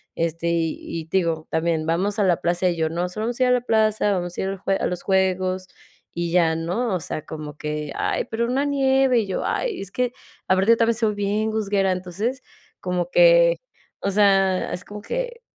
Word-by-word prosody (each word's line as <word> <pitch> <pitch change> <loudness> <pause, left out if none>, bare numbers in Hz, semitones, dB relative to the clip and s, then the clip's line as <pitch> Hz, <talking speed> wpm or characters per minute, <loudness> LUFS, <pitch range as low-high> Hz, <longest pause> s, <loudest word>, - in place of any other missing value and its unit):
este, 165 0 -2
y 165 0 -2
y 160 - -11
te 175 +4 0
digo 165 -3 -1
también 160 -1 0
vamos 190 +6 0
a 205 - +2
la 180 -3 +2
plaza 175 +2 +1
y 175 - -1
yo: 160 -1 0
"No 170 +2 -2
solo 215 +5 -3
vamos 240 +1 -4
a 255 - +4
ir 250 - +3
a - - +4
la 250 -1 +3
plaza, 215 -3 +2
vamos 175 -2 -3
a - - -1
ir 190 - -1
al 195 - -4
jue 195 +1 0
a - - -1
los 180 -1 -4
juegos 185 -1 0 0.4
y 170 0 -3
ya", 165 -2 +3
¿no?, 185 +7 -1
o 180 - -1
sea, 155 - -5
como 150 -2 -7
que: 150 -1 -4
"Ay, - - -1
pero, 230 +1 -2
una 265 +4 0
nieve", 270 -3 +3
y 215 - -2
yo: 190 - -2
"Ay, 480 -5 -1
es 195 -1 -7
que 250 +1 0 0.4
aparte 195 +5 +4
también 230 0 +2
soy 220 -2 +1
bien 205 +2 0
gusguera". 200 -3 +1
Entonces 185 +8 -3 0.4
como 180 +6 -2
que, - - +6 0.4
o - - -1
sea, 195 -2 +3
es 180 - -4
como 210 0 -8
que, - - -4
195 Hz, 220 wpm, -23 LUFS, 170-230 Hz, 0.4 s, que